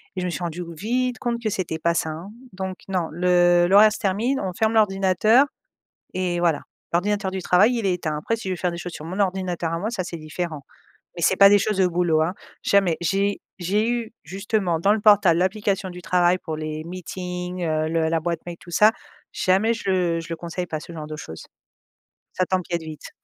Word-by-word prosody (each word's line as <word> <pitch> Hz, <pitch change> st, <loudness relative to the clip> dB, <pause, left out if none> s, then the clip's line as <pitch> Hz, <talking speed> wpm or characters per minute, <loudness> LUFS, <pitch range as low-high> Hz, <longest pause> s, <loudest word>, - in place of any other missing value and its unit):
et -, -, -3 dB
je -, -, -2 dB
me -, -, -1 dB
suis 175 Hz, -, -4 dB
rendu 170 Hz, +1 st, -4 dB
vite 245 Hz, +8 st, -1 dB
compte 235 Hz, -1 st, -2 dB
que 215 Hz, -, +1 dB
c'était 185 Hz, -5 st, -3 dB
pas 170 Hz, +1 st, +1 dB
sain, 160 Hz, -, 0 dB
hein, 165 Hz, +5 st, -8 dB, 0.2 s
donc 190 Hz, 0 st, -5 dB
non, 180 Hz, -3 st, 0 dB
le 175 Hz, +1 st, +4 dB
le 195 Hz, +3 st, +5 dB
reste 215 Hz, +1 st, +5 dB
termine, 220 Hz, +8 st, 0 dB
on 185 Hz, -1 st, -3 dB
ferme 220 Hz, +4 st, +1 dB
l'ordinateur 210 Hz, +4 st, +4 dB, 0.7 s
et 180 Hz, -1 st, -1 dB
voilà 170 Hz, -4 st, +2 dB, 0.3 s
l'ordinateur 195 Hz, +2 st, 0 dB
du 190 Hz, -1 st, -4 dB
travail, 205 Hz, +8 st, +4 dB
il 230 Hz, -, -2 dB
éteint. 175 Hz, -5 st, -1 dB
Après 230 Hz, +9 st, -1 dB
si 215 Hz, -, -6 dB
je -, -, 0 dB
veux -, -, -7 dB
faire 180 Hz, 0 st, -1 dB
des 170 Hz, -, -6 dB
choses 175 Hz, 0 st, -6 dB
sur 150 Hz, -, -8 dB
mon 185 Hz, +5 st, -5 dB
ordinateur 180 Hz, -3 st, -1 dB
à 165 Hz, -, -1 dB
moi 210 Hz, +6 st, -2 dB
ça 205 Hz, -6 st, -3 dB
c'est 175 Hz, -, -6 dB
différent, 155 Hz, -1 st, -5 dB, 0.5 s
mais 170 Hz, -, -6 dB
c'est 190 Hz, -, +3 dB
pas 200 Hz, -, +9 dB
des 205 Hz, -, +6 dB
choses 210 Hz, +1 st, -1 dB
de 190 Hz, -1 st, +4 dB
boulot, 170 Hz, -2 st, +1 dB
hein, 165 Hz, +3 st, 0 dB, 0.3 s
jamais 195 Hz, -5 st, +3 dB
j'ai 195 Hz, +3 st, 0 dB, 0.2 s
j'ai 205 Hz, +6 st, +1 dB
eu 235 Hz, -2 st, -2 dB
justement 190 Hz, 0 st, -1 dB
dans 195 Hz, +5 st, +3 dB
le 220 Hz, -, 0 dB
portable 200 Hz, -5 st, +5 dB
l'application 195 Hz, 0 st, 0 dB
du 180 Hz, 0 st, -9 dB
travail 180 Hz, 0 st, +3 dB
pour 160 Hz, -3 st, -5 dB
les 155 Hz, 0 st, -4 dB
meetings, 180 Hz, 0 st, -5 dB
heu, 155 Hz, -1 st, 0 dB
le 160 Hz, -1 st, +1 dB
la 165 Hz, 0 st, +1 dB
boîte 170 Hz, 0 st, -2 dB
mail 175 Hz, -1 st, -7 dB
tout 175 Hz, -, -13 dB
ça 210 Hz, +5 st, +6 dB, 0.4 s
jamais 195 Hz, +5 st, +2 dB
je 185 Hz, -6 st, 0 dB
je 165 Hz, -, -8 dB
le 165 Hz, -, -2 dB
conseille 170 Hz, +2 st, -5 dB
pas 155 Hz, -, -3 dB
ce -, -, -10 dB
genre 155 Hz, -2 st, -7 dB
de 155 Hz, -, -6 dB
choses, 80 Hz, -, -9 dB, 0.9 s
ça 185 Hz, -, 0 dB
t'empiète 175 Hz, -2 st, -1 dB
vite. 155 Hz, -1 st, -9 dB
180 Hz, 220 wpm, -23 LUFS, 170-200 Hz, 0.9 s, pas